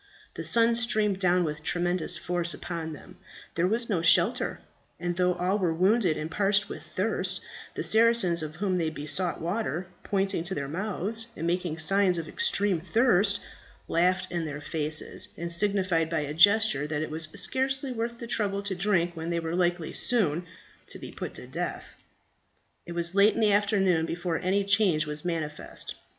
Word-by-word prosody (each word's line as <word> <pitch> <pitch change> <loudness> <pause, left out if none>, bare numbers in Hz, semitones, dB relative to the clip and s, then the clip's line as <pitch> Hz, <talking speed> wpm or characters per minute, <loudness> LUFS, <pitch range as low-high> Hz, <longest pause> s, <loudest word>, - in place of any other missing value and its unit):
The - - -6
sun 230 0 +4
streamed 215 -4 +2
down 180 -1 +3
with 150 -2 -4
tremendous 175 +1 -1
force 175 -1 -1
upon 165 -2 -5
them; 150 - -13 0.4
there 170 +2 +1
was 230 +4 +1
no 190 -7 0
shelter; 165 - +3 0.4
and 175 0 -2
though 180 0 +2
all 185 +4 0
were 170 -4 0
wounded 190 -1 +2
and 155 +1 -5
parched 200 +2 +2
with - - -7
thirst, - - -1 0.4
the - - -3
Saracens 220 -6 +4
of 155 0 -6
whom 185 +1 -1
they 165 -2 0
besought 160 +4 -2
water, 180 0 -2 0.2
pointing 195 -4 -1
to 190 +1 -2
their 140 -1 -3
mouths 210 +6 -3
and 165 - -4
making 175 -2 -1
signs 185 +2 +3
of 165 - -3
their - - -11
extreme 205 - +1
thirst, 200 +1 +2 0.5
laughed 180 +2 +1
in 170 -2 -2
their 145 -1 -5
faces, 155 +1 -3
and 170 +1 -4
signified 185 -3 +1
by 165 -1 0
a 145 0 -4
gesture 200 -4 +4
that 155 0 -2
it 155 - -6
was 155 0 -1
scarcely 265 0 0
worth 235 0 -3
the 235 - -7
trouble 200 -4 0
to 200 -1 -2
drink 175 -2 +1
when 165 +1 -5
they 170 0 0
were 165 0 -3
likely 175 -2 0
so 245 - +1
soon 170 +4 -5 0.4
to - - -8
be - - -9
put - - -7
to - - -8
death. - - -5 0.9
It 170 - -6
was 170 0 0
late 200 +2 +5
in - - -2
the 215 -2 +3
afternoon 195 -5 +2
before 175 -1 -2
any 195 +2 +1
change 195 -6 +3
was 150 0 -5
manifest. 160 -4 -4
180 Hz, 185 wpm, -27 LUFS, 165-205 Hz, 0.9 s, late